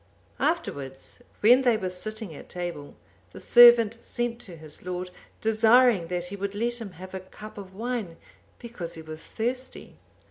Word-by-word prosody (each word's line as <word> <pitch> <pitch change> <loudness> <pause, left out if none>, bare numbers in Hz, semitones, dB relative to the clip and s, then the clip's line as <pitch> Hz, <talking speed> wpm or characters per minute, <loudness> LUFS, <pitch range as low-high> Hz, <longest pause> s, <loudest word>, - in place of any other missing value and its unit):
Afterwards, 135 - -2 0.2
when 245 +5 +7
they 245 -4 +3
were 190 -3 -3
sitting 215 +1 -6
at - - -12
table, 175 -5 -6 0.4
the - - -9
servant 235 -2 +7
sent 240 -1 -3
to 180 -7 -10
his 155 -2 -10
lord, 180 0 -4 0.3
desiring 225 -3 +4
that 175 0 -2
he 185 +3 -6
would 200 0 -4
let 235 +2 -1
him 200 -5 -7
have 185 +3 -11
a 190 - -4
cup 210 +3 -12
of 190 -2 -10
wine, 225 -6 -4 0.4
because 230 -9 -6
he 160 - -9
was 155 0 -9
thirsty. 255 +3 -5
205 Hz, 165 wpm, -26 LUFS, 175-235 Hz, 0.4 s, when